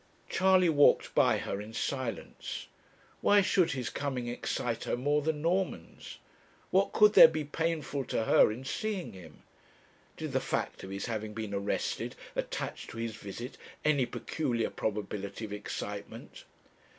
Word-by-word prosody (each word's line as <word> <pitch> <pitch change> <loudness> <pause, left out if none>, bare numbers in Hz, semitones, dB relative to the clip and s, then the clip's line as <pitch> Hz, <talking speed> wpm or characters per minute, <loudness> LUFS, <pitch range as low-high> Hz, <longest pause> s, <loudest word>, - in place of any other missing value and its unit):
Charley 185 -1 +4
walked 145 -3 +4
by - - +4
her 100 - -3
in 105 +2 -9
silence. 130 -2 -4 0.6
Why 205 0 +6
should 185 -4 +2
his 130 -3 -3
coming 130 -4 -3
excite 120 -1 -2
her - - -1
more 145 +4 +1
than 150 0 -2
Norman's? 185 +3 -2 0.5
What 195 +1 +3
could 210 0 +6
there - - +11
be 155 -1 -2
painful 150 -2 -2
to 115 - -1
her 110 - +5
in 125 +5 -7
seeing 200 +5 -3
him? 85 -5 -13 0.7
Did - - -4
the - - +1
fact - - -3
of 95 - -7
his 100 0 -4
having 110 -2 -4
been 110 -2 -4
arrested 100 +1 -2 0.2
attach - - -4
to - - -9
his 115 -1 -3
visit 110 +5 -8 0.3
any 145 -5 +3
peculiar 120 -7 -2
probability 105 0 -3
of 105 - -7
excitement? 105 - -6
125 Hz, 150 wpm, -31 LUFS, 110-160 Hz, 0.7 s, there